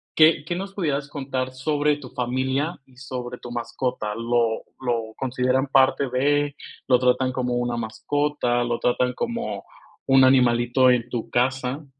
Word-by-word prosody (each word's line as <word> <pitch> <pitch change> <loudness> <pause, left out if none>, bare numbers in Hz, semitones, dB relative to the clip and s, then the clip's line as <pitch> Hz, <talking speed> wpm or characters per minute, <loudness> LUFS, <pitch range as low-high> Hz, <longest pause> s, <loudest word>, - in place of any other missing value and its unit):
¿qué 155 -2 +5
qué 175 - -2
nos 195 +2 -5
pudieras 145 -7 -1
contar 135 -3 -3
sobre 145 +2 0
tu 135 -4 -11
familia 130 +7 -2
y 130 -1 -24
sobre 125 -2 -6
tu 120 - -10
mascota? 120 -2 -3
¿Lo 115 0 0 0.2
lo 115 -4 -2
consideran 130 +1 0
parte 135 0 +3
de? 145 +3 +1 0.3
¿Lo 125 - +5
tratan 130 +1 +2
como 125 -1 -2
una 120 -1 -1
mascota? 120 +2 -1
¿Lo 120 -1 -2
tratan 125 +1 +1
como 235 - -4 0.4
un 135 -1 +6
animalito 125 0 +4
en 125 -1 +2
tu 120 -2 -4
casa? 130 +3 -1
130 Hz, 150 wpm, -23 LUFS, 120-140 Hz, 0.4 s, un